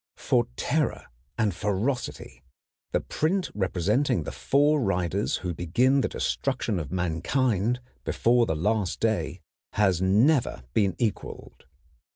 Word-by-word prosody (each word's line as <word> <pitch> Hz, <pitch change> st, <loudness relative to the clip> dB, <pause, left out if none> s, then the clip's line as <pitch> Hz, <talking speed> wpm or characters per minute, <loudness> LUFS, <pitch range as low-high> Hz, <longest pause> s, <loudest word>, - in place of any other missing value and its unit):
For -, -, +1 dB
terror -, -, -1 dB, 0.3 s
and 110 Hz, -4 st, +1 dB
ferocity 105 Hz, -, -3 dB, 0.5 s
the -, -, +1 dB
print 180 Hz, +4 st, -1 dB
representing 100 Hz, -, +1 dB
the -, -, -5 dB
four 145 Hz, +2 st, +2 dB
riders 95 Hz, -2 st, 0 dB
who 90 Hz, -, -1 dB
begin 120 Hz, -, +2 dB
the -, -, +1 dB
destruction 120 Hz, -7 st, -1 dB
of 75 Hz, -3 st, -6 dB
mankind 100 Hz, -, 0 dB, 0.2 s
before 120 Hz, 0 st, +2 dB
the 80 Hz, -, 0 dB
last 105 Hz, +3 st, 0 dB
day 110 Hz, -1 st, -1 dB, 0.3 s
has 95 Hz, -4 st, +2 dB
never 110 Hz, -, +3 dB
been 100 Hz, -4 st, +2 dB
equaled. 110 Hz, -, -4 dB
105 Hz, 120 wpm, -26 LUFS, 90-125 Hz, 0.5 s, never